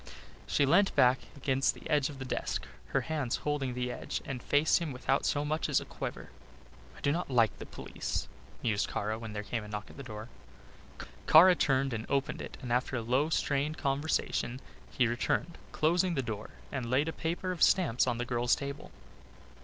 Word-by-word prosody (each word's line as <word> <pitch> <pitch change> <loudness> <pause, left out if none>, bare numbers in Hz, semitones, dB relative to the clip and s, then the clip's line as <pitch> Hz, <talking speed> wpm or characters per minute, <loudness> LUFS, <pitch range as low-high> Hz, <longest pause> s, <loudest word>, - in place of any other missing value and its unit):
She 140 - +3
leant 195 +8 +4
back 125 +1 +5 0.2
against 135 -1 +1
the - - -10
edge 145 -2 +2
of 145 - -9
the 130 - -6
desk, 120 - -2 0.2
her - - +1
hands 150 -6 -1
holding 140 -4 -1
the 125 0 -2
edge, - - -4
and 130 -3 -4
faced 145 +6 +3
him 165 -4 -3
without 125 -1 0
so 145 0 +1
much 155 +2 -1
as - - +4
a - - -8
quaver. - - -6 0.7
"I - - -13
do 140 - +2
not 170 +1 -2
like 115 -4 +3
the - - -7
police," - - -4 0.4
mused 105 -4 +1
Kara, 110 +2 -2
when 110 -2 -7
there 105 0 -4
came 115 +1 -3
a - - -9
knock 105 0 -6
at - - -15
the - - -6
door. 110 -4 -8 1.0
Kara 180 +4 +9
turned 135 -5 +1
and 110 0 -4
opened 140 -1 0
it - - -8
and 120 -1 -1
after 125 +1 0
a 120 - -1
low 130 +7 +2
strained 150 0 0
conversation 135 -3 -1 0.3
he 125 - +2
returned, 120 +8 -1
closing 175 +3 +2
the 135 - 0
door 110 -3 -5 0.2
and 130 -4 -3
laid 135 +5 +2
a 160 - -2
paper 175 +3 -2
of 180 - -6
stamps 165 -11 +4
on 120 - 0
the 120 - -2
girl's 120 0 +2
table. 140 0 -6
135 Hz, 200 wpm, -31 LUFS, 120-150 Hz, 1.0 s, Kara